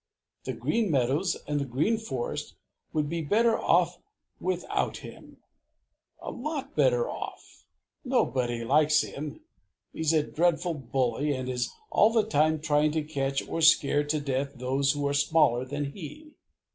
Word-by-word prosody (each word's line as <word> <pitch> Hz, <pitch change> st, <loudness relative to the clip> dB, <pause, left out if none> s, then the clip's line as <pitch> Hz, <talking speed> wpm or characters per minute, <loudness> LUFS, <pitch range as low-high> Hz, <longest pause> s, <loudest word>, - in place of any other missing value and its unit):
The -, -, -2 dB
Green 225 Hz, -3 st, 0 dB
Meadows 140 Hz, +6 st, +1 dB
and 145 Hz, 0 st, 0 dB
the -, -, 0 dB
Green 155 Hz, -, 0 dB
Forest 130 Hz, -, -4 dB, 0.4 s
would 150 Hz, -2 st, 0 dB
be 165 Hz, +2 st, -2 dB
better 225 Hz, +8 st, +3 dB
off -, -, +2 dB, 0.4 s
without 185 Hz, -1 st, -1 dB
him, -, -, -12 dB, 0.8 s
a -, -, -6 dB
lot 285 Hz, +2 st, -5 dB
better -, -, +3 dB
off! -, -, -8 dB, 0.4 s
Nobody 125 Hz, -, 0 dB
likes 150 Hz, +4 st, +4 dB
him. 150 Hz, -, -6 dB, 0.5 s
He's 160 Hz, -1 st, 0 dB
a 155 Hz, -2 st, +3 dB
dreadful 175 Hz, +2 st, +1 dB
bully 135 Hz, 0 st, -1 dB
and 130 Hz, -1 st, -4 dB
is 125 Hz, -1 st, -2 dB, 0.2 s
all 215 Hz, -, +5 dB
the 225 Hz, -2 st, +2 dB
time 155 Hz, -5 st, +2 dB
trying 150 Hz, -1 st, +2 dB
to 155 Hz, -1 st, 0 dB
catch 140 Hz, -3 st, -2 dB
or 165 Hz, -, -3 dB
scare 145 Hz, -2 st, +5 dB
to 150 Hz, +1 st, 0 dB
death 140 Hz, 0 st, -2 dB
those 135 Hz, +2 st, +1 dB
who 145 Hz, -1 st, -1 dB
are 140 Hz, -, 0 dB
smaller 145 Hz, -4 st, +3 dB
than 145 Hz, +1 st, -3 dB
he. 300 Hz, -, -10 dB
150 Hz, 150 wpm, -28 LUFS, 135-175 Hz, 0.8 s, all